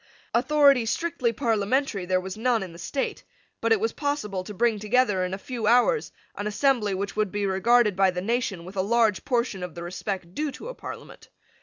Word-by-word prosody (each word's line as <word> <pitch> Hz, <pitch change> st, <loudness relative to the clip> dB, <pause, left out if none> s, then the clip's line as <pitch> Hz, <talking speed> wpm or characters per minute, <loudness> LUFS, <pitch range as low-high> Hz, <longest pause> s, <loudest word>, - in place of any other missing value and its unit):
Authority 275 Hz, -1 st, +4 dB
strictly 325 Hz, -3 st, 0 dB
parliamentary 225 Hz, -3 st, 0 dB
there 185 Hz, 0 st, +2 dB
was 185 Hz, 0 st, -6 dB
none 230 Hz, -1 st, +1 dB
in 180 Hz, -3 st, -8 dB
the 170 Hz, -, -12 dB
state: 270 Hz, +9 st, -3 dB, 0.4 s
but -, -, 0 dB
it 445 Hz, -, +5 dB
was 450 Hz, +2 st, -1 dB
possible 215 Hz, -11 st, -2 dB
to 195 Hz, -, -8 dB
bring 220 Hz, +1 st, +1 dB
together, 210 Hz, -3 st, +2 dB
in 180 Hz, -, -2 dB
a 190 Hz, -, -3 dB
few 230 Hz, +1 st, -4 dB
hours, 250 Hz, -, +3 dB, 0.2 s
an 205 Hz, -, -3 dB
assembly 215 Hz, -3 st, +1 dB
which 200 Hz, +1 st, -4 dB
would 210 Hz, -3 st, 0 dB
be 205 Hz, -1 st, -1 dB
regarded 210 Hz, +2 st, +3 dB
by 190 Hz, 0 st, +4 dB
the 180 Hz, -1 st, -3 dB
nation 200 Hz, -4 st, -2 dB
with 185 Hz, +2 st, -10 dB
a 190 Hz, -, +1 dB
large 220 Hz, 0 st, +2 dB
portion 235 Hz, -6 st, 0 dB
of 180 Hz, -2 st, -6 dB
the 170 Hz, -, -6 dB
respect 180 Hz, 0 st, -5 dB
due 300 Hz, +6 st, -2 dB
to 470 Hz, -, -8 dB
a -, -, -5 dB
Parliament. -, -, -10 dB
215 Hz, 205 wpm, -26 LUFS, 190-250 Hz, 0.4 s, it